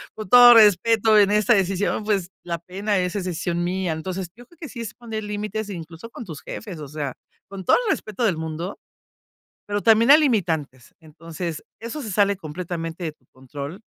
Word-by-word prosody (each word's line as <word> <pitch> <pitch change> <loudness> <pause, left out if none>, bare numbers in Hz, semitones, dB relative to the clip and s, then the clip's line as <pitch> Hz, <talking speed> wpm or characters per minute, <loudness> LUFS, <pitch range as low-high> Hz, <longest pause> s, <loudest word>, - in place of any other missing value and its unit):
con 215 - -7
todo 245 +3 +9
respeto 220 +1 +5
en 205 -1 +5
esta 210 +3 +4
decisión, 195 +1 0
pues, 195 -4 -1
la 170 -1 -3
pena, 195 +5 -2
es 180 0 -1
es 195 -3 -2
decisión 175 -1 -2
mía". 180 -1 -1
Entonces, 180 +3 -5
yo 245 +2 -14
creo 340 - -23
que 315 - -8
sí 235 - -7
es 220 -2 -6
poner 225 -3 -6
límites, 210 +1 -4
incluso 170 +2 -8
con 235 - -9
tus 160 -6 -9
jefes, 195 -7 -8
o 150 - -7
sea, 145 -2 -4 0.3
con 195 -1 -8
todo - - +4
el 410 - +2
respeto 215 - -3
del 195 -8 +2
mundo, 160 +4 -5 0.9
pero 205 0 -2
también 230 +4 +5
hay 300 - +9
limitantes, 165 - -1
entonces, 165 +1 -7 0.2
eso 235 +7 -6
se 220 -6 -6
sale 200 +1 +2
completamente 165 0 -6
de 155 - -4
tu 130 - -37
control, 140 +6 -8
190 Hz, 195 wpm, -23 LUFS, 165-215 Hz, 0.9 s, todo